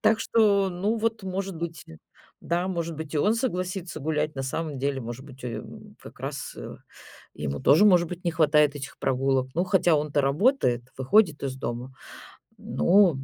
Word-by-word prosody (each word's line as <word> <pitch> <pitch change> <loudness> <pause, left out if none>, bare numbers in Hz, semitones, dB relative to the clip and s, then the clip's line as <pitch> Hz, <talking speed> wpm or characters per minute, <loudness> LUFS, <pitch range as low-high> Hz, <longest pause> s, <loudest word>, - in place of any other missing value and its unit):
Так 220 0 +3
что, 205 -4 +3
ну, 195 +6 -1
вот, 225 -1 -1
может 190 0 -4
быть, 165 -1 -5
и 80 - -12 0.4
да, 175 +2 -1
может 170 -3 -3
быть, 160 0 -7
и - - +2
он 210 +8 +3
согласится 185 -8 -3
гулять. 150 +1 -1
На 135 - -2
самом 145 +2 -3
деле, 135 0 -1
может 120 +2 -7
быть, 130 -2 -13
о - - -2
ё, 115 - -4
м, - - -11
м, - - -15
как - - -13
раз, - - -5
э, - - -8 0.6
ему 70 -1 -4
тоже, 155 +9 +5
может 180 -4 +5
быть, 180 +1 -7
не 170 - +2
хватает 150 -2 +4
этих 135 -1 -8
прогулок. 135 0 +1
Ну, 175 - +1
хотя 180 -3 +3
он-то 150 -1 +1
работает, 140 - +2 0.2
выходит 160 +3 +3
из 130 -1 -3
дома. 125 0 -5 0.7
Ну, 190 -1 +4
м. 135 -1 -6
160 Hz, 195 wpm, -26 LUFS, 135-190 Hz, 0.7 s, тоже